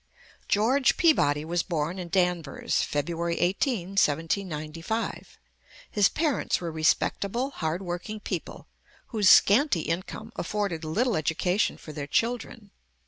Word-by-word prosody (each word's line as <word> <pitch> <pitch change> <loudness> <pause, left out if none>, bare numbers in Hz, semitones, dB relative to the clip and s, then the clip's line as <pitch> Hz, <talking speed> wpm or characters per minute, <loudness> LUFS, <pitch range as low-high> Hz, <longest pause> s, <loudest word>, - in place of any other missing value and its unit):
George 245 +6 +3
Peabody 150 - +3
was 170 +1 0
born 170 +1 -2
in 175 -1 -6
Danvers, 175 -5 -1
Feb. 170 +3 -1
18, 190 +1 0
1795. 165 +2 -2 0.5
His 205 -2 +4
parents 310 -4 0
were 170 -2 -4
respectable, 200 - 0
hard 170 - -3
working 180 +4 -5
people, - - -5 0.4
whose 210 -5 +3
scanty 220 - +5
income 185 +8 -4
afforded 195 -3 -2
little 220 +9 0
education 180 +5 0
for 155 - -10
their 145 -2 -5
children. 230 +1 -2
180 Hz, 115 wpm, -27 LUFS, 165-215 Hz, 0.5 s, scanty